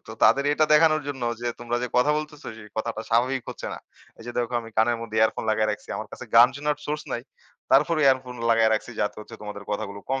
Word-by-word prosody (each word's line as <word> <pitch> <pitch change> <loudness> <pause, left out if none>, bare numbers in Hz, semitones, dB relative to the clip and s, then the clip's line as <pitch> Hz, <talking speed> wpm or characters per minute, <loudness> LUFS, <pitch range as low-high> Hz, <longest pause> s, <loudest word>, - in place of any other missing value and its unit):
তো - - -6
তাদের 140 +1 +5
এটা 155 +1 +3
দেখানোর 155 -1 +5
জন্য 135 -3 -5 0.2
যে, 120 - -4
তোমরা 120 0 -2
যে 125 - -2
কথা 125 +4 +4
বলতেছ, 150 -1 -8
সে 110 - -11
কথাটা 110 0 -2
স্বাভাবিক 125 +2 +2
হচ্ছে - - -7
না। - - -8 0.4
এইযে 120 +2 -7
দেখো, 120 0 -1
আমি 115 0 -11
কানের 115 +2 +3
মধ্যে 110 -1 -6
ইয়ারফোন 110 0 +2
লাগায় 110 0 +1
রাখছি। 105 - -6
আমার - - -6
কাছে - - -8
গান 120 +2 +9
শোনার 150 0 -1
সোর্স 150 +1 -2
নাই। 120 - -3 0.5
তারপরও 150 +3 +4
ইয়ারফোন 130 -2 +2 0.2
লাগায় 115 -1 +4
রাখছি, 110 - -3
যাতে 105 0 -1
হচ্ছে 110 +2 -11
তোমাদের 105 -1 -7
কথাগুলো 100 -1 -3
কম 135 0 0
120 Hz, 225 wpm, -25 LUFS, 110-140 Hz, 0.5 s, গান